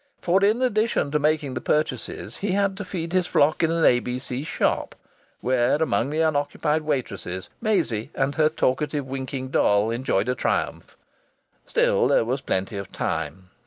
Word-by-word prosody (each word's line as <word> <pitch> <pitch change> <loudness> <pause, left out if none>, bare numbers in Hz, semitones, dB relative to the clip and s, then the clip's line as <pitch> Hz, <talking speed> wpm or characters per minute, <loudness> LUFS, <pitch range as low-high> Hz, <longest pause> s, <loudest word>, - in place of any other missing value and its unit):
For 185 +3 +2
in 220 +5 +3
addition 220 - +1
to 150 - +2
making 150 -2 +1
the 125 - -4
purchases 155 +1 -2
he 200 -2 -1
had 200 -1 +1
to 205 - -4
feed 175 -2 -5
his 185 -1 +2
flock 150 +2 +3
in 165 - +3
an 165 0 +2
A.B.C. 125 +2 +1
shop, - - -1 0.5
where 125 0 +2
among 145 -5 +1
the 155 +2 0
unoccupied 150 0 +1
waitresses 100 -11 -3
Maisie 115 - 0
and 135 +1 0
her 155 0 +3
talkative, 145 0 0
winking 130 0 -5
doll 105 -3 +3
enjoyed 115 -3 0
a 125 - +2
triumph. - - -2 0.7
Still - - +3
there - - +3
was 130 +4 -1
plenty 95 -2 -2
of 100 -1 -6
time. 80 +3 -4
145 Hz, 165 wpm, -24 LUFS, 120-160 Hz, 0.7 s, in